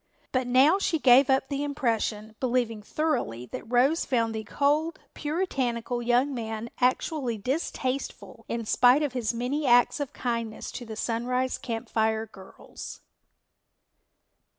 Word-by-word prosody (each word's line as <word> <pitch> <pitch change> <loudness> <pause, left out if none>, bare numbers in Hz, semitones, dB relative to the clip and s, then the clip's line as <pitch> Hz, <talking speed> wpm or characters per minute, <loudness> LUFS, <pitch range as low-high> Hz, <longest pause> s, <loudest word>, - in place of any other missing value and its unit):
But 255 -1 0
now 270 +9 +5
she 345 -4 +1
gave 265 -1 +6
up 265 0 +3
the 280 0 -2
impression, 225 -6 -1
believing 240 -4 0
thoroughly 210 - -2
that 225 - -7
Rose 265 +7 +3
found 230 -3 0
the 220 0 -4
cold, 295 +8 +1 0.2
puritanical 260 -7 -2
young 245 +4 +2
man 225 -1 -5
actually 255 -1 0
distasteful 260 +2 -3
in 230 -1 -2
spite 250 +6 +5
of 285 -4 -2
his 240 -4 0
many 255 +5 -2
acts 245 +3 +5
of 285 -2 -3
kindness 230 -3 -3
to 245 - -7
the 220 - -6
Sunrise 250 +3 -1
Camp 230 -3 -4
Fire 220 0 +1
girls. 195 -3 -11
245 Hz, 135 wpm, -27 LUFS, 230-275 Hz, 0.2 s, gave